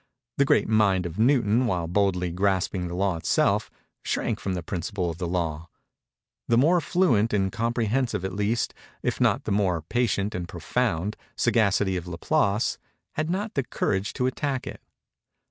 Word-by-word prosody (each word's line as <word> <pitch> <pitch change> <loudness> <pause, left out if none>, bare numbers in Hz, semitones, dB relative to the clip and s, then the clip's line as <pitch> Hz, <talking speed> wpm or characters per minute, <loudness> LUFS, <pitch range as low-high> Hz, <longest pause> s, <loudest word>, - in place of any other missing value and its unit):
The 140 - +4
great - - +3
mind 100 -4 +3
of 85 +3 -5
Newton, 120 -1 +3
while 90 -6 -1
boldly 90 -1 +1
grasping 95 0 0
the 85 - -5
Law 95 -2 0
itself, 80 - +1 0.3
shrank - - -1
from 95 -1 -2
the 90 - -4
principle 90 +1 -3
of 80 - -9
the 90 - -2
Law. 85 -2 -2 0.8
The 115 - +3
more 165 +7 +4
fluent 130 - +2
and 95 -2 +1
comprehensive 115 -2 0
at 95 - -3
least, 105 +3 0 0.3
if - - -1
not - - +3
the - - -3
more 95 -5 +1
patient 105 0 0
and 90 -1 -4
profound, 90 +5 -1 0.2
sagacity 100 -4 +2
of 90 0 -6
Laplace, 100 +4 0 0.3
had 155 +1 -2
not 205 +5 -2
the 140 - +1
courage 100 -5 -1
to 125 - -1
attack 130 0 -1
it. - - -8
100 Hz, 165 wpm, -26 LUFS, 90-120 Hz, 0.8 s, The